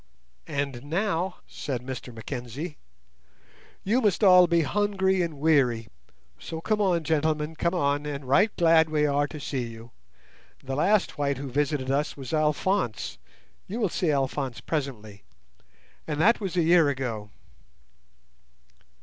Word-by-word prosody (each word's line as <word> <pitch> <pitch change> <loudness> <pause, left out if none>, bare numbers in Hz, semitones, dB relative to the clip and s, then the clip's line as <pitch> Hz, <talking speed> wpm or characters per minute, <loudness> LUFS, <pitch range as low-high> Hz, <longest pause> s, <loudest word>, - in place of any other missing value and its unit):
"And 140 -3 -3
now," 180 +2 -1
said 125 -4 -5
Mr 125 -1 -6
Mackenzie, 125 +6 -6 1.0
"you 230 +6 +2
must 210 -2 +1
all 180 -2 +8
be 170 -1 +3
hungry 190 +2 +1
and 165 -4 -3
weary; 130 -8 +2 0.5
so 160 - -6
come 210 +5 0
on, 180 -5 +2
gentlemen, 155 0 0
come 170 +3 0
on, 145 -2 0
and 140 -2 -5
right 190 - +4
glad 165 -2 +5
we 150 -1 +2
are 145 0 +1
to 150 - -8
see 130 -4 -3
you. 115 +1 -11 0.7
The 135 0 -4
last 185 +1 +1
white 140 -2 0
who 135 -1 -6
visited 140 -1 0
us 145 +2 -1
was 135 0 -7
Alphonse—you 150 - -2
will 210 -5 +1
see 170 0 -1
Alphonse 135 -3 -1
presently—and 110 -8 -4 1.0
that 225 +7 +4
was 190 -3 -3
a 170 - +4
year 165 -2 +5
ago." 120 -6 -3
150 Hz, 135 wpm, -26 LUFS, 135-175 Hz, 1.0 s, all